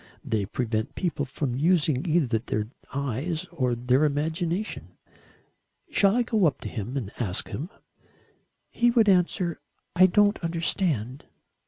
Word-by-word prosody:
They 105 -4 -1
prevent 110 -1 -2
people 165 -6 -1
from 135 -1 -3
using 155 0 +2
either 140 -9 +2
their 105 -2 -3 0.2
eyes 140 +5 -2
or 130 -8 0
their 125 +4 +2
imagination. 160 +7 -2 0.9
Shall 200 +1 +4
I 245 - +3
go 220 -6 +2
up 145 - -2
to - - -5
him 120 +4 -4
and 110 -7 -4
ask 100 -7 -2
him?" 155 +7 -5 1.0
"He 240 0 +3
would 235 -3 +4
answer: 180 -2 +2 0.4
'I 185 +1 +7
don't 205 +2 +3
understand.'" 165 - -1
155 Hz, 135 wpm, -26 LUFS, 125-180 Hz, 1.0 s, I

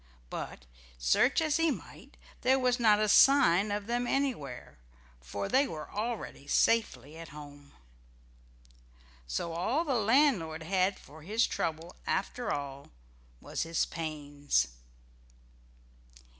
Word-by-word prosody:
But 60 - -6 0.3
search 60 - +3
as 310 0 +1
he 330 0 +2
might - - -8 0.2
there 260 +2 +4
was 250 -1 +1
not 215 -3 +5
a 215 - +2
sign 215 -5 +5
of 205 0 -2
them 240 +2 -1
anywhere, 150 - -3 0.4
for 65 +12 -5
they 270 +2 +3
were 155 -2 -7
already 215 -9 -4
safely 160 - +1
home 145 -3 -11
again. - - -24 1.5
So 165 - -3
all 240 - 0
the 280 - 0
landlord 220 - +2
had 185 +3 +1
for 155 +3 -15
his 215 +8 +1
trouble 165 +2 -3
after 240 +5 -2
all, 140 -1 -5 0.5
was - - -5
his 165 0 0
pains. 145 - -2
180 Hz, 120 wpm, -30 LUFS, 145-245 Hz, 1.5 s, not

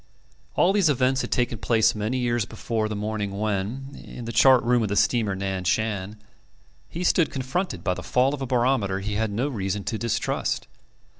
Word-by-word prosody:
All 185 - +4
these 200 -6 +3
events 130 -1 +2
had - - -4
taken 120 -3 0
place 115 0 +3
many 110 +4 -2
years 120 -2 +1
before 110 -1 -3
the 105 - -3
morning 105 -1 -3
when, 110 +7 -3
in 120 - -9
the 115 - -4
chart 130 +2 +6
room 120 0 +3
of 110 - -1
the 100 - -1
steamer 105 0 +2
Nan 95 -1 -3
Shan, 105 +1 -1 0.7
he 175 - -4
stood 170 -2 +3
confronted 130 - -3
by 90 - +1
the - - -6
fall 130 +3 +2
of 145 - -5
a 135 - -2
barometer 120 -6 +1
he 105 +2 -3
had 110 +1 0
no 120 +7 -1
reason 100 -6 -3
to 110 - -3
distrust. 115 -2 -1
115 Hz, 195 wpm, -25 LUFS, 105-130 Hz, 0.7 s, chart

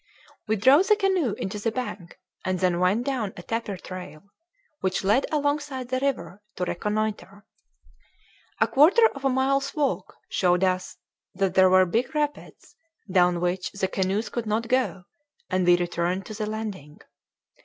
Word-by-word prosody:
We 220 - +2
drove 270 - +5
the 425 - +5
canoe 380 - +1
into 205 +2 -5
the 225 +2 -1
bank, 210 -7 -6 0.3
and 185 0 -1
then 180 -2 +1
went 195 +7 +2
down 245 -8 -2
a 175 - -8
tapir 225 -3 -3
trail, 180 -4 -9 0.6
which 190 0 -1
led 215 +8 +2
alongside 290 -3 -1
the 255 0 0
river, 205 - -2
to 180 - -3
reconnoiter. 210 +1 -3 1.1
A - - +4
quarter 350 - +5
of 275 - -10
a - - +4
mile's 275 +2 0
walk 290 -3 -1
showed 180 0 +1
us 185 -1 -1 0.4
that 190 -1 0
there 185 -1 +6
were 185 0 +6
big 240 - -1
rapids, 295 -1 -4 0.4
down 180 -2 +3
which 180 +1 -1
the 195 -1 -1
canoes 195 +4 -1
could 230 0 -4
not 220 +2 -1
go; 255 -7 0 0.5
and 185 -1 +1
we 175 0 +6
returned 175 +2 -2
to 215 - -8
the 215 0 -3
landing. 210 -9 -6
210 Hz, 160 wpm, -25 LUFS, 185-260 Hz, 1.1 s, there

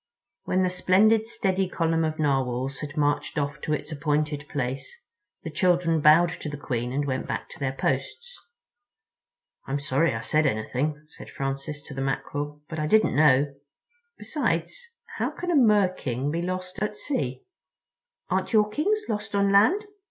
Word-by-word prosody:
When 185 0 +1
the 180 - +1
splendid 215 +5 +3
steady 190 -4 0
column 165 -2 +1
of 155 0 -1
Narwhals 135 -2 0
had 150 -1 -7
marched 145 +1 0
off 145 0 -2
to 155 - -1
its 150 +1 -3
appointed 150 -1 -1
place 135 - -4 0.4
the 160 - -5
children 170 0 +2
bowed 155 +4 +6
to 155 - -6
the 145 - -6
Queen 125 -4 -3
and 140 +2 -1
went 130 -2 -2
back - - -4
to - - -12
their 135 -2 -1
posts. 135 - -2 1.3
"I'm 135 - -1
sorry 140 0 +1
I 110 - -3
said 155 +4 +2
anything," 140 +6 -2
said 155 - -12
Francis 135 +2 -4
to 140 - -9
the 135 - -4
Mackerel, 145 +2 -3
"but 160 -1 -5
I 155 - 0
didn't 215 -1 +3
know. 140 -1 +4 0.6
Besides, - - -2 0.3
how - - +1
can 355 0 -4
a - - +2
Mer 210 -8 +5
king 130 -2 -3
be 165 +2 -1
lost 185 +1 -4
at 210 0 -2
sea?" 130 - -3 0.8
"Aren't - - -1
your 210 -1 +4
Kings 410 - 0
lost 210 -1 -3
on 200 0 +3
land?" 340 - +4
150 Hz, 165 wpm, -26 LUFS, 140-185 Hz, 1.3 s, bowed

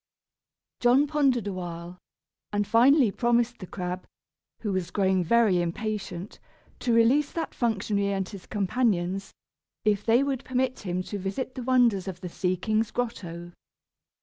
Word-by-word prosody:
John 250 +4 +5
pondered 275 -7 +1
awhile, 175 -2 -6 0.5
and 205 0 0
finally 240 +3 +5
promised 240 +2 +1
the 185 - -8
crab, 180 0 -5 0.5
who 210 -3 -2
was 185 -2 -2
growing 190 -1 +2
very 200 -1 +3
impatient, 195 +1 -4 0.4
to 245 - 0
release 240 +6 +4
that 330 - -3
functionary 205 -3 0
and 195 -1 -1
his 195 -3 -10
companions, 195 -3 0 0.5
if 210 -1 +2
they 235 +5 +4
would 270 -2 -2
permit 255 0 -1
him 180 -2 -3
to 205 +2 -5
visit 195 +8 -3
the 255 - -6
wonders 240 -7 +3
of 180 -2 -6
the 180 - -5
sea 180 +1 -1
king's 215 +4 0
grotto. 175 -9 -4
205 Hz, 145 wpm, -27 LUFS, 185-240 Hz, 0.5 s, John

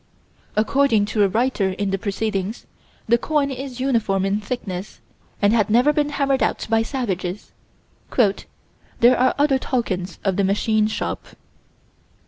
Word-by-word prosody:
According 220 0 +3
to 215 - +2
a 200 - +5
writer 220 -1 0
in 200 0 -2
the 195 - -1
Proceedings, 200 0 -3 0.4
the 235 +1 +4
coin 290 -1 0
is 260 -1 -6
uniform 220 -7 +1
in 200 +2 0
thickness, 200 -4 -5 0.4
and 205 +2 +5
had 220 -3 +2
never 245 +7 +4
been 295 0 +1
hammered 275 -2 0
out - - 0
by 225 0 +4
savages 205 -6 -3 0.7
"there 235 +2 +1
are 255 +1 +3
other 285 -2 +3
tokens 195 -9 -2
of 195 -2 0
the 200 - +2
machine 215 +2 +2
shop." 215 - -3
220 Hz, 140 wpm, -22 LUFS, 195-255 Hz, 0.7 s, a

